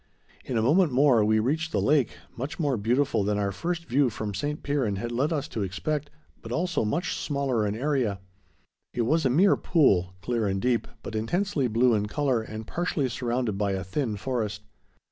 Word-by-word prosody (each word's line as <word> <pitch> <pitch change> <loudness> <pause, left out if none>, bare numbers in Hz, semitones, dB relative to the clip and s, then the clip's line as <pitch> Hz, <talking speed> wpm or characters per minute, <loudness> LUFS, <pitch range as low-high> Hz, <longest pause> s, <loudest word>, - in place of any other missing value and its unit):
In 125 - -2
a 110 - +2
moment 155 +6 +4
more 125 -3 +4
we 110 +1 +3
reached 155 +9 0
the - - +1
lake, 145 -5 +2 0.2
much 135 +5 -5
more 145 -5 +1
beautiful 120 +2 +1
than 105 +1 0
our 100 -1 0
first 170 - -3
view 135 0 +2
from 105 -2 -4
St. 145 +8 -3
Piran 135 -8 0
had 120 +5 -4
led 135 +6 0
us 145 -3 -1
to 110 - -4
expect, 140 +11 -2 0.3
but, 115 - -9
also, 165 +1 0
much 160 - -1
smaller 135 -7 0
in 100 - -2
area. 125 -6 0 0.8
It 120 - +1
was 155 +4 +2
a - - +1
mere 180 +11 +5
pool, 95 - +2
clear 115 -3 0
and 95 0 0
deep, 120 +1 +1 0.2
but - - -6
intensely, 145 - 0
blue 120 +2 +3
in 105 -1 +1
color 130 0 0
and 110 0 -7
partially 160 -2 -1
surrounded 120 -4 -2
by 100 -2 +1
a 95 -1 -2
thin 105 - -2
forest. 105 -3 -3
125 Hz, 195 wpm, -27 LUFS, 110-145 Hz, 0.8 s, mere